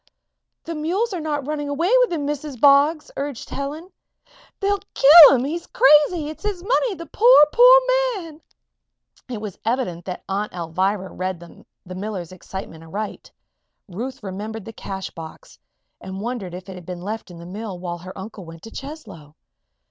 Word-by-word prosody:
"The 335 - -5
mules 365 +9 -1
are 360 - -3
not 295 -3 -3
running 290 -1 -3
away 330 +7 0
with - - +3
him, 310 -4 -2
Mrs. 290 -3 -4
Boggs," 285 +3 +4
urged 280 -3 -5
Helen. 300 +6 -5 0.7
"They'll 405 0 +1 0.2
kill 295 +1 +10
him! 245 - 0
He's 335 +4 -4
crazy! 300 +3 +4
It's 310 - -8
his 405 -4 -4
money 475 0 +1
the 335 0 -8
poor, 455 -4 +6
poor - - +8 0.4
man!" 330 -4 -10 0.9
It 240 -4 -4
was 210 -3 -7
evident 220 -8 -2
that 180 -1 -6
Aunt 205 +2 -3
Alvirah 185 +3 -2
read 185 -1 -3
the 175 +1 -14
miller's 185 -3 -5
excitement 185 -3 -9
aright. 205 +6 -6 0.6
Ruth 235 +7 -6
remembered 205 +2 -6
the 225 - -9
cash 190 -2 -6
box 160 -1 -11 0.4
and 190 0 -7
wondered 210 -5 -5
if 185 +1 -10
it 190 - -7
had 180 -2 -11
been 180 -1 -6
left 215 +2 -5
in 175 - -11
the 170 - -11
mill 200 +1 -6
while 175 -1 -5
her 185 +2 -10
uncle 195 0 -9
went 165 -1 -12
to 225 - -10
Cheslow? 220 - -10
225 Hz, 170 wpm, -22 LUFS, 185-305 Hz, 0.9 s, kill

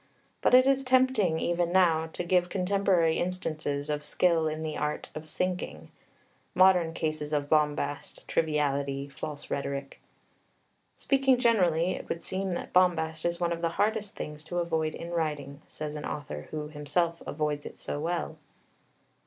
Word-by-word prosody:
But - - +5
it 255 0 +7
is 270 0 +3
tempting, 255 -10 +3
even 175 0 0
now, 165 -3 +4
to - - -3
give 180 0 +2
contemporary 185 -3 +2
instances 155 -5 -2
of 150 -1 -2
skill 165 -1 +2
in 155 +1 -3
the 155 -1 -3
Art 150 0 -2
of 155 0 -8
Sinking 180 - -3 0.6
modern 180 -3 +5
cases 155 -2 -2
of 145 -1 0
bombast, 150 -2 0
triviality, 140 -3 0
false 145 +1 -7
rhetoric. 140 0 -4 0.9
"Speaking 270 -2 +3
generally, 185 -8 +3
it - - -6
would 170 - -3
seem 190 0 -2
that - - -5
bombast 160 -3 +2
is 170 0 0
one 170 -1 +1
of 170 - -5
the 170 - +1
hardest 210 -1 0
things 150 0 -6
to 175 - -4
avoid 160 -2 0
in 170 +1 -7
writing," 150 -4 -2
says 150 -1 -5
an 150 - -5
author 75 - -5
who 150 -1 -5
himself 165 +3 -1
avoids 150 -1 -2
it - - -11
so 145 - -4
well. 165 0 -2
160 Hz, 155 wpm, -29 LUFS, 150-180 Hz, 0.9 s, it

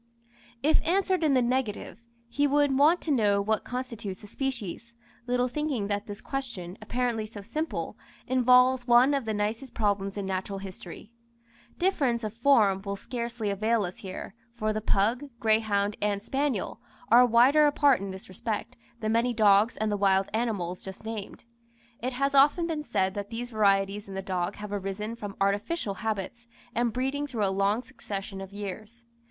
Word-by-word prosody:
If 310 +2 +4
answered 370 0 +1
in 295 -3 +3
the 255 - +4
negative, 240 -3 -2 0.3
he 285 +5 +1
would 285 -1 +3
want 305 +6 +5
to 315 - -2
know 210 -6 +3
what 215 +1 0
constitutes 230 -6 -5
a - - -8
species, 235 -1 -4 0.3
little 250 0 +1
thinking 255 -6 -2
that 205 +2 -2
this 205 -1 -7
question, 230 -10 -5
apparently 230 0 -1
so 210 -2 -10
simple, 310 +10 -3 0.3
involves 250 0 +4
one 245 +4 +6
of 275 -4 0
the 220 - -1
nicest 220 +5 -3
problems 200 -2 0
in 200 - -3
natural 190 +1 -3
history. 195 +1 -9 0.7
Difference 275 -11 +1
of 215 -1 -3
form 225 -6 +4
will 200 0 -4
scarcely 235 -1 -4
avail 215 +2 +1
us 180 - -7
here, 190 0 -7 0.2
for 215 -2 -1
the 215 - -2
pug, 220 +6 +1
greyhound, 215 -2 +2
and 205 -1 0
spaniel, 270 -4 -1 0.3
are 240 +2 +8
wider 250 +6 +5
apart 285 -5 +4
in 195 - -4
this 190 +1 -8
respect, 220 +5 -4 0.3
than 215 0 0
many 235 +2 +2
dogs 210 +1 +4
and 215 0 0
the 205 - 0
wild 195 -1 +3
animals 205 -6 -2
just 190 +2 -9
named. 220 -1 -6 0.6
It 255 +2 -2
has 275 +2 0
often 290 +5 +5
been 320 -3 -2
said 195 -8 0
that 205 0 -5
these 240 +1 -5
varieties 200 -1 +2
in 195 - -8
the 195 - -4
dog 185 0 -2
have 210 0 -7
arisen 205 +3 -3
from 205 -3 -7
artificial 200 +5 0
habits 220 +2 -3 0.3
and 240 0 +1
breeding 270 +5 -2
through 230 -7 -1
a 195 - 0
long 200 +5 +1
succession 195 -6 -6
of 195 0 -8
years. 210 +3 -7
220 Hz, 170 wpm, -28 LUFS, 200-255 Hz, 0.7 s, are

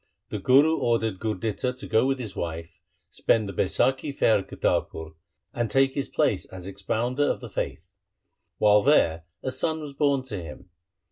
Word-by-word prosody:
The - - -4
Guru 145 +5 +4
ordered 115 -4 0
Gurditta 110 +3 -2
to - - -8
go 110 +4 +3
with 135 0 +1
his 110 -6 -7
wife, 85 0 -5 0.3
spend 110 -2 +1
the 100 - -6
Baisakhi 130 - +1
fair 115 -6 +3
at 95 - -8
Kartarpur, 80 -1 -2 0.4
and 120 -2 -1
take 135 +3 +3
his 140 - -2
place - - 0
as 95 -1 -9
expounder 110 +8 -1
of - - -1
the - - -9
faith. 90 +3 -5 0.6
While 105 0 +5
there 85 - +3 0.2
a 130 - -2
son 160 +5 -1
was 150 -2 -7
born 140 -2 +1
to 105 -8 -5
him. 85 +2 -11
115 Hz, 175 wpm, -26 LUFS, 95-135 Hz, 0.6 s, While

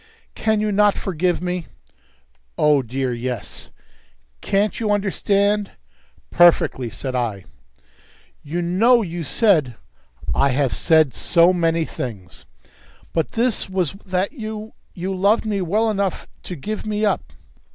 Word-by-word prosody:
"Can 220 -1 0
you 215 0 0
not 205 0 +3
forgive 180 -1 -1
me?" 180 -1 -3 0.9
"Oh, 150 -2 +4
dear, 130 +1 -2
yes." 120 -2 -5 0.7
"Can't 200 +2 0
you 220 -2 -1
understand?" 205 0 +1 0.6
"Perfectly," 165 -7 +4
said 130 +6 -5
I. 110 -6 -2 1.0
"You 170 +4 -3
know 225 +8 +4
you 175 -2 -5
said 155 - +2 0.3
" - - -21
"I 140 - +3
have 135 -1 0
said 155 -5 +3
so 170 +2 +4
many 165 -2 +1
things!" 100 -12 -8 0.7
"But 165 -2 -1
this 235 -4 0
was 185 -5 -1
that 185 +1 -1
you 220 -4 -7 0.2
you 185 +2 -3
loved 200 +5 +2
me 205 -3 -1
well 210 +6 +1
enough 200 -3 -1 0.2
to 180 - -5
give 210 +8 -5
me 215 0 -1
up." 205 - -1
180 Hz, 130 wpm, -21 LUFS, 145-210 Hz, 1.0 s, Oh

